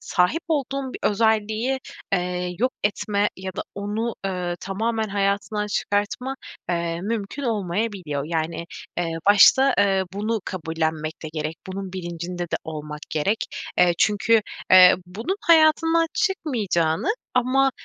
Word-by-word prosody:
sahip 180 - +1
olduğun 275 -3 -1
bir - - -6
özelliği, 220 +4 +1 0.3
eee, 180 -1 -1
yok 255 +4 +1
etme 205 0 +1
ya 190 0 -6
da - - -2
onu, 210 +4 -2
ııı, 180 -2 -2
tamamen 220 +3 -1
hayatından 200 +1 0
çıkartma, 205 +6 -1 0.3
eee, 170 -1 -1
mümkün 215 +6 -3
olmayabiliyor. 195 - -2
Yani, 165 +1 -2 0.3
eee, 170 -2 -1
başta, 255 +7 +7
eee, 195 -1 +3
bunu 215 +2 -1
kabullenmek 160 -2 -3
de 160 - -5
gerek. 155 0 -3
Bunun 190 0 -6
bilincinde 175 -1 -5
de 170 - -2
olmak 150 -1 -6
gerek. 195 +8 0 0.3
Eee, 180 -1 +5
çünkü, 220 +2 +3 0.3
eee, 185 -1 +9
bunun 225 - -3
hayatından 325 0 +5
çıkmayacağını 225 - 0 0.3
ama, 260 +2 +3
200 Hz, 125 wpm, -23 LUFS, 175-230 Hz, 0.3 s, eee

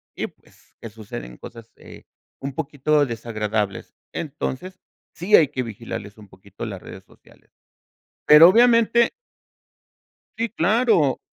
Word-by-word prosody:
y, - - -3
pues, - - -25
que 115 - -8
suceden 100 - -9
cosas, 115 -1 -12
eh, - - -14 0.4
un 135 0 -5
poquito 145 0 0
desagradables. 110 -4 -4 0.2
Entonces, 160 +4 -5 0.4
sí 190 +5 +3
hay 155 - +6
que 130 -2 -4
vigilarles 110 -2 -8
un 105 -1 -15
poquito 100 +3 -11
las 100 -5 -7
redes 95 - -11
sociales. - - -24 0.8
Pero 150 +3 +9
obviamente 235 +2 +4 1.2
Sí, 230 +1 -1
claro. 195 - +2
130 Hz, 120 wpm, -22 LUFS, 110-175 Hz, 1.2 s, Pero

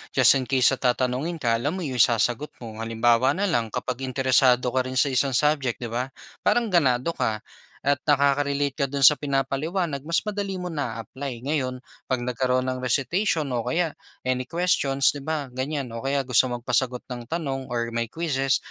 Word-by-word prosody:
just - - +7
in 130 - -5
case 130 -2 +4
na - - -20
tatanungin 130 +6 0
ka, 125 -8 -1
alam 145 +8 -1
mo 185 - -4
yung 130 -5 -3
isasagot 120 +5 +2
mo. 110 -1 -8
Halimbawa 115 +4 +2
na 195 - -1
lang, 120 -9 +1
kapag 125 +3 -4
interesado 130 -1 +3
ka 130 0 0
rin 130 - -5
sa 135 +2 +3
isang 130 0 +1
subject, 145 -3 +2
di 115 - -5
ba? 125 +2 -1 0.3
Parang 235 -3 +1
ganado 135 -4 +2
ka 110 -9 -2 0.4
at 140 0 +2
nakaka-relate 140 -1 +2
ka - - +4
dun 140 -1 +2
sa 150 - +9
pinapaliwanag 145 +3 -2
mas 165 +4 0
madali 200 -2 -3
mo 180 -2 -5
naa-apply. 130 -1 -5
Ngayon, 135 -4 -1 0.3
'pag 130 - +2
nagkaroon 125 +1 0
ng 130 0 -3
recitation 150 - 0
o 120 - 0
kaya 160 +6 -1 0.3
any 130 0 -1
questions, 145 -6 +2
di 145 - -7
ba, 145 -3 -3
ganyan 130 -1 -3
o 115 - -5
kaya 135 0 -1
gusto 125 +1 +3
magpasagot 125 +1 -1
ng 120 -2 -8
tanong 135 -6 -3
or 115 -1 -2
may 115 -1 -2
quizzes, 135 -5 0
135 Hz, 185 wpm, -25 LUFS, 125-145 Hz, 0.4 s, sa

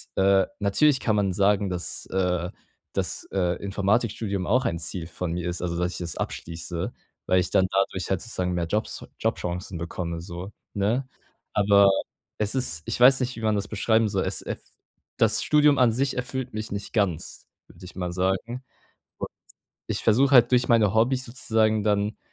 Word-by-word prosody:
äh, 95 0 +4
natürlich 130 +8 +3
kann 110 - +1
man 100 -3 +1
sagen, 100 +1 +2
dass 90 -3 -3
äh, 90 -2 0 0.4
dass, - - -1
äh, 90 -2 +1
Informatikstudium 100 -1 0
auch 125 +5 +2
ein 85 -7 0
Ziel 85 0 -3
von 85 0 -4
mir 90 0 -3
ist, 85 - -4
also, 85 -1 -2
dass 90 +1 -1
ich - - -6
das 85 -2 -4
abschließe, 85 +4 -4 0.3
weil 95 - +3
ich 90 - -1
dann 95 - +3
dadurch 95 -1 0
halt 95 -3 0
sozusagen 90 -6 -2
mehr 85 -1 -1
Jobs 105 +6 -3
Jobchancen 90 +1 -2
bekomme, 85 0 -4
so, 85 +3 -7 0.2
ne? 110 +7 0 0.5
Aber 100 -1 +5 0.5
es 105 -1 +1
ist 85 -12 +1
ich - - -3
weiß 135 +2 +7
nicht, 125 0 -2
wie - - -7
man 110 -1 +1
das 100 -1 -2
beschreiben 110 +1 +2
soll, 95 -1 -1
es - - -1
es - - -8 0.4
das - - +3
Studium 150 -1 +4
an 125 -3 +5
sich 135 +4 0
erfüllt 125 0 -4
mich 110 +1 -5
nicht 100 0 -5
ganz, 100 -8 -1 0.2
würde 90 +1 -14
ich 90 - -11
mal 90 -2 -3
sagen, 95 +8 -1 0.5
und - - -5 0.6
ich - - -2
versuche 130 +5 +4
halt 125 -2 +6
durch 125 -1 +3
meine 110 -4 +4
Hobbys 125 +4 +2
sozusagen 110 -3 +1
dann, 105 0 0
100 Hz, 180 wpm, -25 LUFS, 90-115 Hz, 0.6 s, weiß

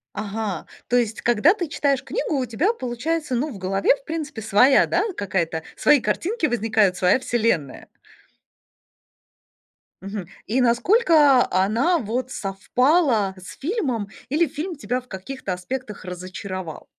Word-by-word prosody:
Ага! 210 -3 -4 0.2
То 245 - +2
есть, 225 -2 0
когда 240 - +4
ты 350 -7 -4
читаешь 280 -2 0
книгу, 410 -11 -2
у 260 - 0
тебя 300 - +1
получается, 260 - -3
ну, 285 +6 -1
в 225 - -8
голове, 195 +7 +2
в 275 - -22
принципе, 300 -8 -5
своя, 220 +6 +5
да, 360 +5 +1
какая-то, 170 -5 -2
свои 295 - +4
картинки 335 - -1
возникают, 220 -6 +1
своя 180 +8 +3
вселенная? 225 - -1 2.1
Мгм. 195 -2 -6 0.2
И 250 +4 +1
насколько, 285 - +4
а, 185 +1 +1
она 255 - +2
вот 250 +3 -3
совпала 220 - +1
с 185 - -11
фильмом? 275 - -2 0.2
Или 310 +2 +2
фильм 325 +5 -5
тебя 250 -1 -2
в 250 - -23
каких-то 195 +1 -6
аспектах 210 +4 -6
разочаровал? 185 -1 -7
240 Hz, 140 wpm, -23 LUFS, 200-290 Hz, 2.1 s, своя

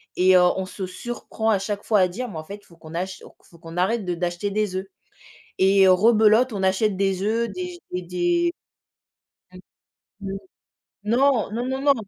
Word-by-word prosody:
et 185 0 +5
on 180 +1 +3
se 190 0 -6
surprend 225 +2 -4
à 205 -3 +3
chaque 205 0 -4
fois 210 -3 +2
à 185 - +4
dire 240 +7 -5
mais 165 - -8
en 155 - -6
fait 200 - -7
il - - -24
faut 170 - -20
qu'on 160 +1 -11
ach 185 +2 -4 0.2
faut 170 - -20
qu'on 165 0 -11
arrête 200 +3 0
de 180 - -1
d'acheter 175 +3 -2
des 210 -2 -1
oeufs, 190 - -4 0.7
et 195 0 +5
heu, - - +7
rebelote, 220 +4 +4
on 195 - -3
achète 190 +2 +1
des 195 -1 0
œufs, 230 +2 0
des 360 -1 -6
et 180 - -2
des, 345 - 0 1.0
mmh, 185 - -12 0.7
mmh, - - -4 0.7
non, 240 -1 +2
non, 240 +3 -3
non, 265 +1 -2
non 285 -1 +5
200 Hz, 195 wpm, -23 LUFS, 185-230 Hz, 1.0 s, heu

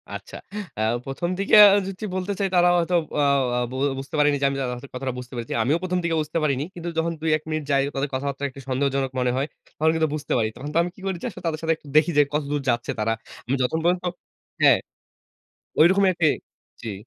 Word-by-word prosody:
আচ্ছা। - - -9 0.4
অ্যা 110 - -1 0.2
১ম 135 +6 -3
দিকে 200 - +3
আ - - +10 0.2
যদি 195 +2 -7
বলতে 185 +2 -2
চাই, 195 - +2
তারা 175 0 +5
হয়তো 175 +1 +1 0.2
অ - - +4 0.4
অ - - +2
বো - - -6 0.2
বুঝতে 135 +3 -7
পারেনি 145 -1 +4
যে - - +3
আমি 140 - -3
তাদের 125 +1 -4
কথাটা 130 -1 -3
বুঝতে 125 +1 -9
পেরেছি। 115 -1 -4
আমিও 145 +7 +2
১ম 180 0 0
দিকে 165 -1 0
বুঝতে 155 +2 -3
পারিনি। 140 -2 +1
কিন্তু 170 0 -5
যখন 165 +1 +1
২, 160 - 0
১ 155 - -18
মিনিট 155 -1 -2
যাই 135 0 +4
তাদের 140 +1 -1
কথাবার্তা 140 +1 -3
একটু 135 - -12
সন্দেহজনক 135 0 0
মনে 125 0 +1
হয়। 140 +3 0 0.3
তখন 160 +1 +3
কিন্তু 160 -1 +2
বুঝতে 150 -1 -3
পারি। 110 -2 +1
তখন 145 +3 -6
তো - - +1
আমি 175 - -3
কি - - -15
করেছি 190 0 -3
আসলে 185 -3 -11
তাদের 155 -1 -2
সাথে 165 0 +2
একটু 150 - -19
দেখি 155 +3 +4
যে, - - +8
কতদূর 145 -1 -1
যাচ্ছে 120 0 0
তারা। 115 +1 +1 0.3
আমি 130 +3 0
যত 125 - 0
পর্যন্ত 175 +1 +2 0.6
হ্যাঁ। - - +7 1.0
ঐরকমই 190 +4 +6
একটি 165 -2 +2 0.5
জি, 115 - -4
150 Hz, 220 wpm, -24 LUFS, 135-170 Hz, 1.0 s, আ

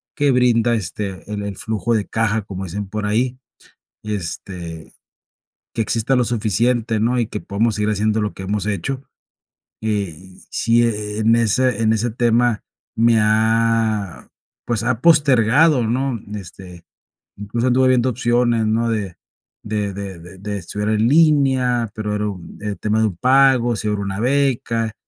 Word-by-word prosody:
que 145 -2 +2
brinda, 120 -2 +3
este, 100 -2 -5
el 105 -1 -3
"el 100 -1 -5
flujo 110 0 -1
de 105 -3 0
caja", 110 -1 0
como 95 -1 -7
dicen 95 +2 -5
por 105 +1 -4
ahí, 120 +4 0 0.7
este, 90 -4 -6 0.8
que 115 - 0
exista 115 +4 0
lo 125 - +2
suficiente, 115 0 0
¿no? 120 +3 +1
Y 115 - 0
que 105 -1 -6
podamos 110 +2 0
seguir 105 0 0
haciendo 105 +1 0
lo 105 - -2
que 95 - -9
hemos 100 0 -2
hecho, 105 +7 -3 0.8
eh, 105 -6 -2 0.4
sí, 115 +1 +2
en 105 0 0
ese 115 +1 +2
en 110 0 +3
ese 115 +2 -1
tema 120 0 +1 0.3
me 115 0 +3
ha, 110 - +1 0.4
pues, 115 -3 -1
ha 120 0 -1
postergado, 140 -3 +4
¿no? 125 0 -1
Este, 90 -3 -10 0.5
incluso 115 +5 -2
anduve 130 +1 +3
viendo 130 0 +3
opciones, 120 -2 +1
¿no? 115 +2 +1
De 100 -6 -3 0.5
de 105 -2 -2
de 100 -3 -7
de 90 +3 -13
de 100 +1 -4
estudiar 105 +3 -4
en 110 +1 +2
línea, 135 -6 +3
pero 105 -1 -3
era 105 0 -1
un, 90 -4 -9
eh, 105 -1 -3
tema 110 +1 0
de 110 - +3
un 100 - -5
pago, 130 -1 +4
si 105 - -3
hubiera 105 -1 -1
una 95 0 -4
beca, 120 -3 0
110 Hz, 160 wpm, -20 LUFS, 105-120 Hz, 0.8 s, postergado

